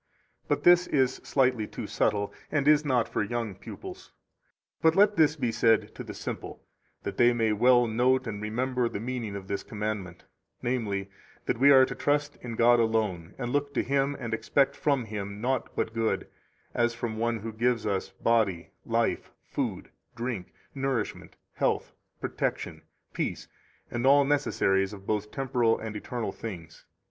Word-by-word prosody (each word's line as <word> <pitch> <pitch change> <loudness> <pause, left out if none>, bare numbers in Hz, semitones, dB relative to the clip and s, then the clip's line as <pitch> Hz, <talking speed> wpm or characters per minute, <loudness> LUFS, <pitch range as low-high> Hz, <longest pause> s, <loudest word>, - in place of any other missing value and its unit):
But - - 0
this 175 0 +6
is 130 -3 +2
slightly 125 -5 +1
too - - -6
subtile, 100 -1 0 0.2
and 145 -2 +1
is 150 0 +6
not 125 -6 +2
for - - -1
young 115 0 -2
pupils. 365 - -10 0.7
24 - - -41
But 160 0 +4
let 205 +1 +5
this 155 -3 +4
be 125 -6 -1
said 115 0 +2
to - - -7
the - - -8
simple, - - -6 0.4
that - - -5
they 120 0 +5
may 115 -2 +1
well 120 +3 +5
note 125 +3 +2
and 105 -3 -5
remember 125 +3 0
the 100 - -5
meaning 115 -3 -4
of 95 -1 -7
this 100 - -2
commandment, 105 -5 -5 0.4
namely, 100 -6 -1 0.3
that - - -1
we 140 +2 +7
are 130 -2 +8
to - - -5
trust 145 0 0
in 120 -2 -5
God 120 +1 +5
alone, 105 -6 0
and 120 -2 -3
look 145 +1 -1
to - - +2
Him 140 +1 0
and 115 -3 -4
expect 140 +4 +2
from 140 -5 +1
Him 100 -1 -5
naught 130 +3 -1
but 115 - -1
good, 115 -1 0 0.5
as 120 -1 +1
from 115 -2 -4
one 115 -1 0
who 110 +1 -5
gives 120 0 +1
us 100 -3 -1
body, 105 -7 0 0.2
life, - - 0 0.2
food, - - -3 0.2
drink, 120 -6 -4 0.2
nourishment, 135 -5 -3 0.2
health, - - 0 0.3
protection, - - -3 0.3
peace, - - -3 0.4
and 120 +2 0
all 140 +1 +6
necessaries 95 -9 +1
of 100 -1 -11
both 105 0 -1
temporal 125 -3 +1
and 110 -1 -6
eternal 115 +2 -3
things. 85 -7 -8
120 Hz, 170 wpm, -28 LUFS, 105-130 Hz, 0.7 s, are